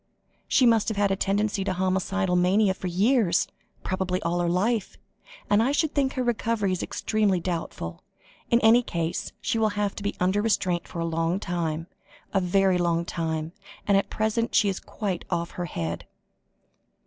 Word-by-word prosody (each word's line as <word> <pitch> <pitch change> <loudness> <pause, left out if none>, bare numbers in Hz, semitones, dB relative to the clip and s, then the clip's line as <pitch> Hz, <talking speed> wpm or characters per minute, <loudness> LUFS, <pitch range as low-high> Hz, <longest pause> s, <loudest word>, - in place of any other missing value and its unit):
"She 260 - +4
must 230 -3 +4
have 220 - -1
had 200 -1 +2
a - - +2
tendency 200 +1 0
to 190 - -1
homicidal 190 0 0
mania 190 +3 +3
for 185 - -6
years, 195 0 +2 0.4
probably 185 -1 -1
all 175 +1 0
her 175 -1 +1
life, 205 +4 0 0.5
and 205 +1 +4
I 250 +4 +2
should 300 +1 +1
think 275 -2 +1
her 255 - -1
recovery 230 -4 0
is 185 - -1
extremely 210 -4 0
doubtful. 165 - -4 0.5
In 235 - +4
any 225 +2 +6
case, 170 -7 -3
she 225 - 0
will 220 -1 +3
have 205 -1 0
to - - -5
be 205 - -2
under 185 +3 +2
restraint 185 -5 0
for 170 - -5
a - - 0
long 165 +2 0
time, 165 -4 -2 0.5
a 195 - +3
very 185 0 +2
long 170 -1 +1
time, 160 -2 -3 0.4
and 200 - +4
at 195 - +2
present 220 +2 -1
she 205 - +4
is 190 - -3
quite 195 -5 -4
off 170 0 -2
her 175 - -4
head." 85 - -4
190 Hz, 180 wpm, -26 LUFS, 175-215 Hz, 0.5 s, any